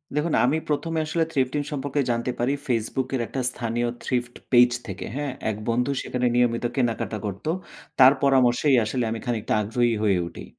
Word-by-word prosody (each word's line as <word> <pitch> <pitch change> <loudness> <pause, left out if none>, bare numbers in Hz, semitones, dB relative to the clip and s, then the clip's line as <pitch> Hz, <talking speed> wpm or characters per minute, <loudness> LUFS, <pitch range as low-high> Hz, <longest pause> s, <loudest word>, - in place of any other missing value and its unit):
দেখুন। 150 +2 0
আমি 140 +5 +2
১ম 150 +2 -1
এ - - +1
আসলে 165 +1 +1
Thrifting 140 0 0
সম্পর্কে 145 0 -1
জানতে 120 +1 -1
পারি 125 +4 +1
Facebook 120 +1 -1
এর 125 - 0
একটা 135 - -3
স্থানীয় 120 -1 -2 0.2
Thrift 125 -1 -2 0.2
পেইজ 125 -1 +6 0.2
থেকে। 95 -2 -6
হ্যাঁ? 145 -1 -2 0.2
এক 110 - -2
বন্ধু 125 +4 +1
সেখানে 125 0 -2
নিয়মিত 120 -1 +2
কেনাকাটা 115 -4 -1
করত। 100 -1 -6 0.5
তার 130 +1 +9
পরামর্শেই 135 0 +4
আসলে 120 +3 -1
আমি 115 - -3
খানিকটা 120 -4 -1
আগ্রহী 120 +3 +1
হয়ে 95 -4 +3
উঠি। - - -9
125 Hz, 175 wpm, -24 LUFS, 115-135 Hz, 0.5 s, তার